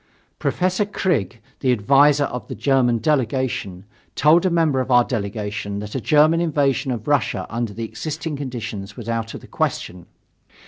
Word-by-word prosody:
Professor 185 +2 0
Krigge, 160 - -1 0.2
the 130 - +2
advisor 140 +6 +4
of 125 -5 -4
the - - -6
German 130 -4 +2
delegation, 120 - -1 0.3
told 165 +5 +4
a - - +2
member 165 -5 +2
of 130 - -2
our 125 -1 +6
delegation 105 -3 -4
that 105 0 -6
a 130 - -2
German 155 +4 +4
invasion 140 -4 +1
of 120 -4 -4
Russia 145 -1 +1
under 115 -1 -2
the 115 +3 -5
existing 150 +8 -5
conditions 115 -7 -6
was 115 - -8
out 115 -1 -3
of - - -8
the - - -14
question. 90 -1 -3
130 Hz, 165 wpm, -21 LUFS, 110-150 Hz, 0.3 s, our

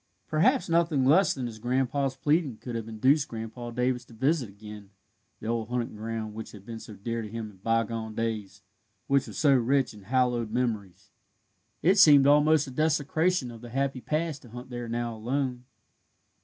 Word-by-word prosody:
Perhaps 155 +3 +2
nothing 165 -5 +2
less 175 +8 +5
than 130 -2 -3
his 115 -2 -7
grandson's 130 +3 0
pleading 145 -2 +1
could 120 - -7
have 115 -1 -4
induced 130 +7 +2
Grandpa 115 +1 -6
Davis 125 +1 -1
to 120 - -17
visit 135 0 +1
again 105 0 -11 0.5
the - - -10
old 115 0 -2
hunting 120 -2 -2
ground 110 0 -4
which 110 +1 -8
had 100 -2 -12
been 115 0 -7
so 110 - -10
dear 115 +3 -3
to 110 - -6
him 110 -1 -6
in 95 - -20
bygone 115 +1 -1
days, 105 -4 -3 0.4
which 140 -1 +2
was - - -8
so 145 -3 +4
rich 130 0 +2
in 105 -2 -14
hallowed 125 -1 +1
memories. 110 -6 -3 0.7
It 190 +5 +4
seemed 145 -7 +8
almost 150 +1 +5
a 135 - -8
desecration 155 0 +1
of 115 -1 -11
the 120 - -9
happy 135 +1 -1
past 155 0 -2
to 120 - -15
hunt 125 +3 -10
there 120 -1 -5
now 120 0 -2
alone. 125 +2 -2
120 Hz, 185 wpm, -28 LUFS, 110-140 Hz, 0.7 s, seemed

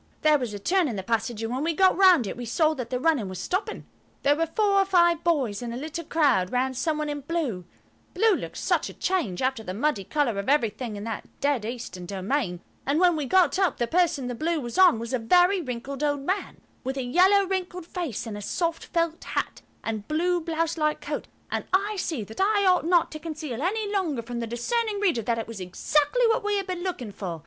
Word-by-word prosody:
There 305 -1 +5
was 245 -4 -3
a 205 - -5
turn 355 - +2
in 235 - -3
the 190 - -4
passage, 225 +1 -1
and 225 +2 -2
when 260 +3 -2
we 330 0 0
got 375 +1 +5
round 365 - +6
it, - - -4
we 245 - -6
saw 310 +7 +2
that 250 -5 -5
the 250 0 -1
running 275 -9 +1
was 185 - -6
stopping. 385 - -3 0.4
There 285 +1 +4
were 330 +2 0
four 400 +3 +2
or - - +5
five 345 -3 +3
boys 265 -12 +1
in 240 -1 -4
a 235 - -4
little 315 +5 -5
crowd 285 - +2
round 260 +1 0
some 305 +4 0
one 305 0 -2
in 290 -1 -3
blue–blue 305 - -2
looked - - -6
such - - 0
a - - -11
change 265 - -1
after 260 -3 0
the 185 -4 -6
muddy 235 -3 0
colour 240 -3 0
of 200 - -3
everything 240 -4 0
in 205 - -6
that 225 -1 -5
dead 280 -6 0
Eastern 225 -7 -6
domain–and 200 - -2
when 355 -2 +5
we 295 -3 -2
got 360 -1 +3
up, 370 -8 +2
the 240 - +1
person 320 -2 +1
the 245 - -3
blue 320 +6 -1
was 240 +3 -4
on 365 -10 +7
was 230 +2 -5
a 255 - +1
very 355 - +4
wrinkled 265 0 -5
old 290 -1 +1
man, 375 +8 -3 0.2
with 265 +1 -3
a 265 - -1
yellow 375 +10 +4
wrinkled 365 -2 -3
face 325 - -4
and 220 -2 -5
a 205 - -6
soft 330 - -2
felt 335 -1 -1
hat - - -3 0.2
and 215 -2 -4
blue 350 +3 +1
blouse 330 0 -1
like 305 0 +1
coat, - - -5 0.2
and - - -1
I 405 +3 +1
see 315 - -2
that 220 - -6
I 405 0 +3
ought 365 -3 +3
not 345 -1 +3
to 310 - -6
conceal 310 -6 -5
any 415 +6 0
longer 320 - -1
from 240 +1 -5
the 230 - -3
discerning 415 - -1
reader 355 - +2
that 230 +2 -1
it 225 - -4
was 225 -3 -7
exactly 295 - +1
what 455 +1 +1
we 415 0 0
had 395 - -2
been 365 -1 -4
looking 345 - -4
for. 180 -4 -5
295 Hz, 230 wpm, -26 LUFS, 235-355 Hz, 0.4 s, on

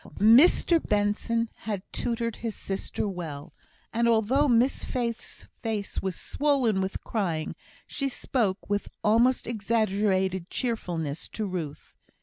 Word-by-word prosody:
Mr 275 - +6
Benson 210 +3 +1
had 205 -4 -4
tutored 230 -1 -2
his 225 -2 -4
sister 195 +2 -3
well; 165 -7 -6 0.4
and 235 +1 +2
although 235 +6 +3
Miss 245 +1 +3
Faith's 235 -2 -4
face 215 -3 -3
was 190 -2 -2
swollen 265 -9 +1
with 190 0 -3
crying, 170 -8 -2 0.3
she 275 -1 -2
spoke 225 -6 -1
with 205 0 -1
almost 235 +4 +3
exaggerated 200 -5 0
cheerfulness 170 - -2
to 215 - -4
Ruth. 170 -7 -5
215 Hz, 120 wpm, -27 LUFS, 190-235 Hz, 0.4 s, Mr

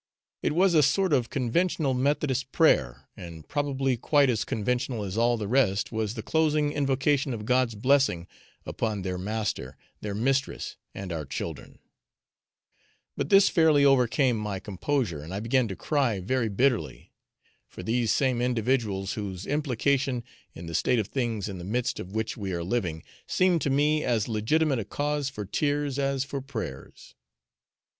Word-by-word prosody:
It - - 0
was 185 +2 +3
a 155 - +6
sort 180 +5 +2
of 125 -4 +2
conventional 140 +2 0
methodist 135 0 0
prayer, 65 - +2
and 80 -3 -10
probably 135 -3 0
quite 140 +2 +3
as 110 -3 -1
conventional 120 +1 -2
as 95 -1 -5
all 120 +1 +2
the 105 -2 -4
rest 105 -5 +2
was 110 -1 -2
the 110 - -5
closing 155 0 +1
invocation 135 -1 +1
of 105 -1 -7
God's 125 -1 +2
blessing 130 -7 +2 0.4
upon 105 -4 -2
their 90 -1 -3
master, 105 - -3 0.2
their 105 -1 -4
mistress, 135 +5 -1 0.2
and 95 -3 -5
our 80 -2 -3
children; 65 - -6 1.4
but 140 - -3
this 195 0 +7
fairly 155 -4 +4
overcame 125 -2 +3
my 105 -3 -3
composure, 100 - -2
and 85 +6 -7
I - - -2
began 115 +3 +1
to 95 - -5
cry 135 - 0
very 115 +4 0
bitterly; 125 +4 0 0.5
for - - -10
these 115 +2 +1
same 130 -1 +1
individuals, 115 -5 0
whose 95 -3 -5
implication 140 -2 0 0.3
in 85 - -8
the 85 - -7
state 125 +8 +2
of 105 -2 -1
things 115 -6 -2
in 95 -3 -6
the - - -7
midst 120 +6 -2
of 95 +2 -8
which 110 0 -2
we 100 -4 -4
are 85 -1 -2
living, 85 -5 -2 0.2
seemed 180 -3 +2
to 140 - 0
me 150 +3 +2
as 115 -4 0
legitimate 130 +6 +1
a - - -2
cause 145 +4 -2
for 105 -5 -6
tears 145 +5 -1
as 135 -1 0
for 140 0 -5
prayers. 110 - -7
125 Hz, 165 wpm, -27 LUFS, 105-140 Hz, 1.4 s, this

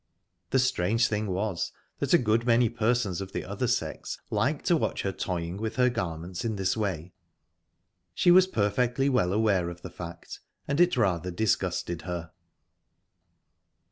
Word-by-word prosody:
The 135 - +2
strange 115 -2 +2
thing 105 0 -1
was 95 -1 -2 0.3
that - - -1
a - - +8
good 110 +2 +1
many 120 -1 +4
persons 110 -4 0
of 95 0 -7
the - - -3
other 100 +7 -2
sex 80 -10 -2
liked - - 0
to - - +4
watch - - -1
her - - 0
toying 85 0 -3
with 110 +1 -3
her 125 -1 +3
garments 90 -5 -4
in 115 -2 -1
this 95 -1 0
way. 90 -6 -3 1.0
She 175 - +4
was 185 +1 +7
perfectly 125 - +1
well 110 -9 +2
aware 100 -4 +2
of 85 0 -10
the 90 - -7
fact, 85 -1 -8 0.3
and 140 +4 +1
it 175 -5 +4
rather 90 -6 +1
disgusted 90 -3 -1
her. 85 -3 -5
100 Hz, 160 wpm, -28 LUFS, 90-120 Hz, 1.0 s, a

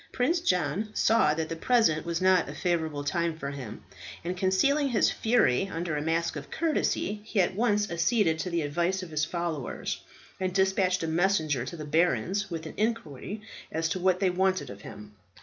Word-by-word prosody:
Prince 275 +8 +1
John 180 - 0
saw 185 -9 +3
that 160 0 -2
the 165 - -4
present 170 -5 +2
was 170 +1 -1
not 185 -5 +4
a 145 - -7
favourable 160 -4 -1
time 165 +2 -1
for 140 -3 -4
him, 130 -6 -8 0.4
and 180 +2 -3
concealing 200 +11 +2
his 235 - +3
fury 210 - +2
under 170 -3 -3
a 145 - -1
mask 165 +2 0
of 150 -1 -7
courtesy, 295 -9 0
he 215 -1 -2
at 185 0 +3
once 210 -1 +1
acceded 170 -1 +2
to 180 - -2
the 170 -2 0
advice 170 +6 0
of 170 - -9
his 155 -1 0
followers, 170 -6 -3 0.4
and 185 -1 -2
despatched 190 -2 +2
a - - -1
messenger 160 -6 +1
to 170 - -7
the 155 - -6
barons 170 - +1
with 165 -2 -5
an 155 - -7
inquiry 210 - -2 0.3
as 160 0 0
to 185 - -2
what 185 0 +2
they 190 -2 +2
wanted 185 - 0
of 100 0 -11
him. 105 0 -10
175 Hz, 190 wpm, -28 LUFS, 155-195 Hz, 0.4 s, not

